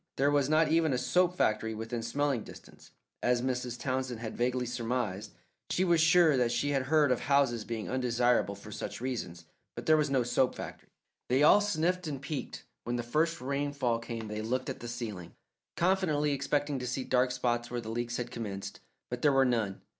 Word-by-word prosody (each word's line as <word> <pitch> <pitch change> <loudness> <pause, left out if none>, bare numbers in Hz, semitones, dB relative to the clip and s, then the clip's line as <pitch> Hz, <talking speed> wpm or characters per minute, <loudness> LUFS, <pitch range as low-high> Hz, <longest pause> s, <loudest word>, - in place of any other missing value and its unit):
There 140 +2 +3
was 145 -1 +2
not 155 0 +4
even 160 -2 +3
a - - +1
soap 180 +8 +2
factory 110 +1 +1
within 115 +2 -4
smelling 135 +2 0
distance, - - -14 0.3
as 125 0 +2
Mrs. 125 -2 -2
Townsend 130 -3 -2
had 115 -2 -5
vaguely 125 +1 0
surmised. 115 -4 -2 0.4
She 185 - +1
was 170 -3 +3
sure 165 -3 +5
that 120 -2 +2
she 120 +4 0
had 135 -2 0
heard 150 -2 +4
of 125 - +2
houses 135 -5 +2
being 115 -2 -4
undesirable 120 -5 +1
for 100 +2 -11
such - - -5
reasons, 100 -10 -4 0.3
but - - -7
there 155 0 +5
was 150 -2 +1
no 135 -2 +2
soap 125 +1 +1
factory. - - -8 0.4
They 130 +3 +3
all 205 +7 +7
sniffed 180 -2 0
and 140 -3 -4
peeked; 140 +1 -5 0.2
when 120 - -2
the 120 - -2
first 160 +7 0
rainfall 140 -3 -1
came 115 -1 -6
they 105 +1 -4
looked 125 +4 -2
at - - -8
the 120 - -7
ceiling, 110 -7 -6 0.4
confidently 170 -5 +2
expecting 140 0 -1
to 125 - -4
see 130 +2 -2
dark 125 0 +2
spots 120 -1 -1
where 120 - -3
the 115 -2 -7
leaks 120 +1 -2
had 120 0 -4
commenced, 100 -5 -6 0.3
but 125 0 -4
there 145 - +5
were 135 -1 +4
none. 115 -6 0
125 Hz, 200 wpm, -30 LUFS, 120-145 Hz, 0.4 s, all